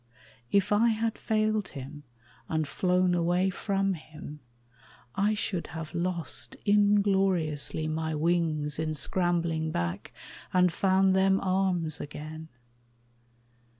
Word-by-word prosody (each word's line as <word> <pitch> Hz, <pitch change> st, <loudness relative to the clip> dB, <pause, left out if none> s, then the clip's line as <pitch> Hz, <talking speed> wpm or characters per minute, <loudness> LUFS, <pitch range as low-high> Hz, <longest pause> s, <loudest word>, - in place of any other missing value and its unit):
If 200 Hz, 0 st, +2 dB
I 210 Hz, +3 st, +4 dB
had 225 Hz, 0 st, 0 dB
failed 215 Hz, -2 st, 0 dB
him 140 Hz, +3 st, -8 dB, 0.5 s
And 160 Hz, -2 st, 0 dB
flown 180 Hz, +3 st, +1 dB
away 175 Hz, +2 st, +2 dB
from 195 Hz, +1 st, 0 dB
him, 155 Hz, -2 st, -10 dB, 0.7 s
I 210 Hz, +2 st, +1 dB
should 185 Hz, -4 st, -3 dB
have 160 Hz, -1 st, -6 dB
lost 170 Hz, -1 st, -2 dB
Ingloriously 195 Hz, -7 st, +2 dB
my 160 Hz, 0 st, -2 dB
wings 155 Hz, -2 st, 0 dB
in 155 Hz, -1 st, -1 dB
scrambling 165 Hz, 0 st, 0 dB
back, 85 Hz, -, -3 dB, 0.4 s
And 180 Hz, -2 st, +3 dB
found 190 Hz, 0 st, +3 dB
them 190 Hz, 0 st, +3 dB
arms 185 Hz, -4 st, 0 dB
again. 155 Hz, +2 st, -8 dB
175 Hz, 110 wpm, -28 LUFS, 155-195 Hz, 0.7 s, I